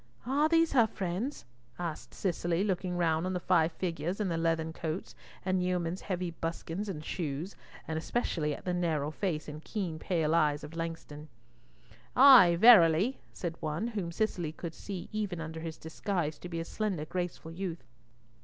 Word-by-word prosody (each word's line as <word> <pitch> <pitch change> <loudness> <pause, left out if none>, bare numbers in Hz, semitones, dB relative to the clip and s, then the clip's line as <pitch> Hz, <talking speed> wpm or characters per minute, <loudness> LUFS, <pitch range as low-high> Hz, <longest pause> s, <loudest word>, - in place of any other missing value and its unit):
"Are 285 +5 +2
these 330 0 +4
her 235 -5 +5
friends?" 200 +8 -3 0.3
asked 170 -3 -5
Cicely, 175 -1 0
looking 185 -3 -1
round 165 0 +1
on 185 - -2
the 180 - -1
five 170 -2 +3
figures 175 +1 -3
in 205 -3 0
the 170 - 0
leathern 165 -1 0
coats 160 +2 -4 0.3
and 185 -1 +1
yeomen's 180 -1 -1
heavy 180 -2 -3
buskins 165 +4 -4
and 155 -5 -5
shoes, 160 +2 -3 0.3
and 160 -1 -2
especially 160 -6 -1
at - - -13
the 180 - 0
narrow 160 -4 0
face 155 -3 -2
and 150 +1 -8
keen 180 -7 -3
pale 160 -3 0
eyes 150 -3 +2
of 150 +2 -8
Langston. 165 -2 -5 0.9
"Ay, 250 -10 +9
verily," 205 +1 +7
said 170 -2 -4
one, 160 +9 -2
whom 200 -7 -3
Cicely 175 -4 -1
could 165 +1 -7
see 190 -1 -6
even 205 -5 -2
under 160 0 -5
his 160 -1 -6
disguise 160 -1 -3
to 180 - -8
be 170 -1 -3
a 165 - -3
slender, 190 -6 -2
graceful 175 -1 -4
youth. 170 -3 -5
170 Hz, 170 wpm, -31 LUFS, 160-190 Hz, 0.9 s, Ay